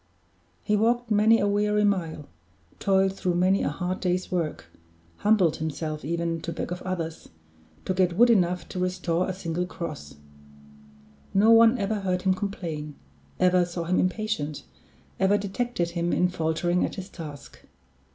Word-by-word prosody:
He 210 - +1
walked 235 +2 +1
many 215 +2 +5
a 205 - +1
weary 210 +1 +2
mile, 165 -7 -1 0.5
toiled 195 -1 +2
through 180 -2 -1
many 185 +3 +3
a - - 0
hard 180 +5 -3
day's 180 0 -1
work, 165 - -2 0.5
humbled 205 -7 +3
himself 155 0 -4
even 170 +1 -2
to 170 - -4
beg 165 - -5
of 180 - -4
others, 165 -3 -5 0.6
to 185 - 0
get 180 -2 +1
wood 240 +1 +6
enough 180 -5 +1
to 185 - -5
restore 180 -1 -1
a - - -1
single 180 -1 -3
cross. 155 - -7 1.2
No 210 +3 +5
one 230 +1 +7
ever 210 0 -1
heard 185 -2 -1
him 190 -1 +3
complain, 165 -7 -5 0.4
ever 180 0 +4
saw 175 0 -4
him 180 +2 +1
impatient, 185 -6 -2 0.6
ever 190 +2 +4
detected 200 -3 -2
him 170 0 -1
in 180 - +2
faltering 175 +1 0
at - - -2
his 185 -2 -6
task. 150 -7 -10
180 Hz, 155 wpm, -26 LUFS, 170-200 Hz, 1.2 s, one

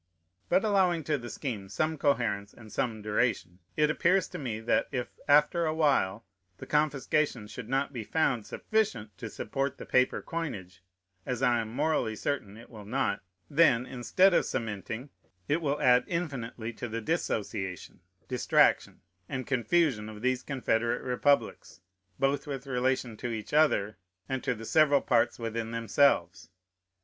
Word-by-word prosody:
But 190 - +3
allowing 185 -5 +2
to 150 -1 0
the 120 0 -8
scheme 110 -9 -5
some 155 +11 -1
coherence 115 -9 0
and 110 -2 -14
some 110 -1 -2
duration, 105 -4 -1 0.2
it 150 0 +3
appears 185 +4 +2
to 180 - -7
me, 120 -6 -3
that, 115 - +1
if, 125 -3 -3 0.2
after 150 +3 +4
a 155 - -1
while, 125 -9 +1 0.3
the - - -9
confiscation 150 -4 +1
should 105 - -9
not 135 +2 0
be 120 -3 -4
found 120 -5 0
sufficient 115 - -1
to - - -5
support 135 0 -3
the - - -8
paper 130 0 +2
coinage, 100 - -5 0.4
(as 125 +1 -3
I 120 -2 +3
am 110 -1 -4
morally 140 -4 0
certain 105 -4 -3
it 115 - -14
will 110 -3 -10
not,) 105 -3 -1 0.3
then, 140 -5 +4
instead 155 +10 +3
of - - +3
cementing, 115 +4 -4 0.4
it 155 +4 +1
will 145 -1 -1
add 125 0 +5
infinitely 125 -9 -4
to 120 +1 -6
the 115 +1 -3
dissociation, 105 - -3 0.3
distraction, - - +2 0.3
and 130 -1 -3
confusion 125 -3 +1
of 105 +1 -10
these 130 0 +1
confederate 120 -4 -1
republics, 130 -5 0 0.4
both 140 +3 0
with 135 -2 -5
relation 125 -3 -1
to 120 - -4
each 110 +1 -5
other 145 -9 +3 0.3
and 130 -1 -3
to 125 -3 0
the 115 0 -9
several 145 +1 +4
parts 115 - +2
within 115 -1 -3
themselves. 110 - +1
125 Hz, 155 wpm, -29 LUFS, 110-145 Hz, 0.4 s, add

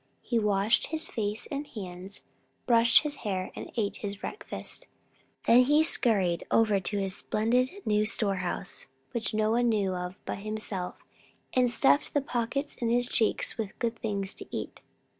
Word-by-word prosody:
He 235 - +1
washed 210 +1 +2
his 320 +1 -3
face 210 -1 -2
and 285 +1 -3
hands, 190 -3 -8 0.4
brushed 230 +1 +6
his 295 -1 -3
hair, 190 -4 -3
and - - -7
ate 205 -3 0
his 200 -1 -4
breakfast. 405 - -7 0.6
Then 240 +2 +7
he 295 +3 +5
scurried 195 - +2
over 215 -3 +4
to 205 +2 -2
his 195 -1 0
splendid 240 +4 +1 0.2
new 210 0 +3
storehouse, 195 -4 -1 0.2
which 225 -3 -2
no 215 0 +2
one 240 +1 +3
knew 200 -4 +1
of 180 +1 -5
but - - -4
himself, 210 -3 -4 0.6
and 250 -1 +4
stuffed 140 - +3
the 290 - +4
pockets 265 +2 -2
in 235 - -1
his 245 +1 +2
cheeks 225 +1 0
with 210 -4 -4
good 235 -1 -1
things 200 -4 -2
to - - -10
eat. - - -5
215 Hz, 160 wpm, -29 LUFS, 195-240 Hz, 0.6 s, Then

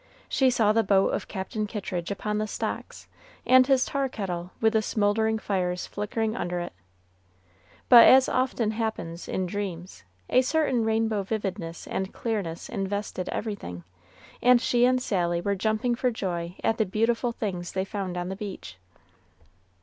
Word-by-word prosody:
She 265 -1 +3
saw 220 -4 +3
the 225 - +4
boat 195 -2 +3
of - - -3
Captain 210 +3 -4
Kittridge 185 -4 -4
upon 210 +1 -2
the 215 - -1
stocks, - - -5 0.4
and 255 0 +6
his 265 -2 +4
tar 275 -2 -1
kettle 180 -6 -4
with 220 0 +3
the 220 - +3
smouldering 220 +1 +1
fires 180 -4 -2
flickering 215 +2 -2
under 175 -6 -2
it; 175 - -5 1.1
but, 240 -2 +9
as 260 0 +7
often 250 -4 0
happens 220 -7 -4
in 185 - -1
dreams, 180 - -5 0.2
a 255 - +4
certain 260 -3 +1
rainbow 220 -1 +1
vividness 195 -5 -4
and 190 0 -4
clearness 200 -8 -3
invested 200 -2 -3
everything, 190 - -5 0.6
and 250 0 +6
she 240 0 +3
and 255 0 +2
Sally 175 -5 0
were 200 +3 0
jumping 220 +4 0
for 250 +1 +1
joy 175 -6 -4
at 225 - +1
the 220 - +3
beautiful 230 +4 +1
things 185 -6 -4
they 190 0 -1
found 190 -3 -4
on 175 +1 -3
the 190 - -4
beach. 190 - -7
210 Hz, 155 wpm, -26 LUFS, 185-230 Hz, 1.1 s, but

